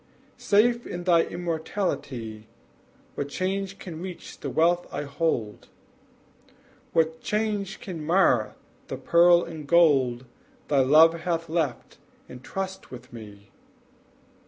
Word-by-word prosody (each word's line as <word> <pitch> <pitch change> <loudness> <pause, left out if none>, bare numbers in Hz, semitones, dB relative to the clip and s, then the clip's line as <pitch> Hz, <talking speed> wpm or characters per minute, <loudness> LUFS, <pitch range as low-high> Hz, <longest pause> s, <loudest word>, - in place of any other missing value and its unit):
Safe 235 +4 +2
in 175 0 -5
thy 175 -2 +4
immortality, 155 - -4 0.7
What 140 - -4
change 195 +4 -3
can 165 -3 -8
reach 180 -1 -8
the - - -4
wealth 175 +2 +2
I - - -3
hold? 140 -7 -2 1.2
What 160 0 +1
chance 210 -2 -2
can 170 -5 -7
mar 150 - +2 0.3
the - - -5
pearl 175 0 +5
and 160 -3 -8
gold 135 -8 +3 0.4
Thy 145 -2 +3
love 160 +5 +6
hath 165 -1 -2
left 155 -7 -3 0.3
in 125 - -10
trust 190 +8 -6
with 125 +1 -12
me? 105 -3 -12
165 Hz, 115 wpm, -26 LUFS, 135-180 Hz, 1.2 s, love